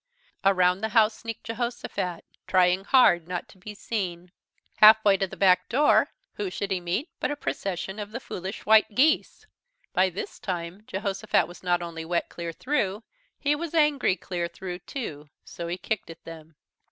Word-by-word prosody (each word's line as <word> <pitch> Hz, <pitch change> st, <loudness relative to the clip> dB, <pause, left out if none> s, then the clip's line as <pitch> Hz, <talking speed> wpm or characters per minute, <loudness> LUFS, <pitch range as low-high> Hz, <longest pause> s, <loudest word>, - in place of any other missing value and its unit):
Around 185 Hz, -1 st, +3 dB
the 220 Hz, -, -1 dB
house 220 Hz, 0 st, +5 dB
sneaked 230 Hz, -1 st, -7 dB
Jehosophat, 230 Hz, -7 st, -4 dB, 0.2 s
trying 185 Hz, +1 st, +3 dB
hard 175 Hz, -10 st, +5 dB
not 180 Hz, -1 st, -4 dB
to 190 Hz, -, -18 dB
be 210 Hz, +3 st, -9 dB
seen. 180 Hz, -5 st, -4 dB, 0.5 s
Half 220 Hz, 0 st, +8 dB
way 200 Hz, -1 st, +6 dB
to 195 Hz, -, 0 dB
the -, -, -11 dB
back 185 Hz, -2 st, +4 dB
door, 285 Hz, +5 st, +4 dB, 0.3 s
who 205 Hz, -2 st, -2 dB
should 195 Hz, +2 st, -4 dB
he 190 Hz, -, +1 dB
meet 180 Hz, -, -2 dB
but -, -, -1 dB
a 290 Hz, -, -2 dB
procession 195 Hz, -6 st, -4 dB
of 205 Hz, -1 st, -5 dB
the 235 Hz, -, -5 dB
Foolish 190 Hz, -4 st, -7 dB
White 215 Hz, 0 st, +5 dB
Geese. 315 Hz, -, +2 dB, 0.5 s
By 185 Hz, +1 st, +3 dB
this 185 Hz, +2 st, -7 dB
time 175 Hz, 0 st, -4 dB
Jehosophat 195 Hz, 0 st, 0 dB
was 175 Hz, -, -13 dB
not 175 Hz, -1 st, +1 dB
only 165 Hz, -1 st, -6 dB
wet 170 Hz, +1 st, -1 dB
clear 170 Hz, -1 st, -5 dB
through, 210 Hz, -, -1 dB, 0.3 s
he 290 Hz, +1 st, +1 dB
was 335 Hz, +1 st, -5 dB
angry 295 Hz, -, +3 dB
clear 175 Hz, -3 st, -4 dB
through 180 Hz, +1 st, -7 dB
too, 150 Hz, -, -7 dB, 0.2 s
so 170 Hz, -, -7 dB
he 175 Hz, +1 st, -3 dB
kicked 210 Hz, -3 st, -3 dB
at 165 Hz, -, -11 dB
them. 160 Hz, -1 st, -11 dB
190 Hz, 175 wpm, -26 LUFS, 175-220 Hz, 0.5 s, Half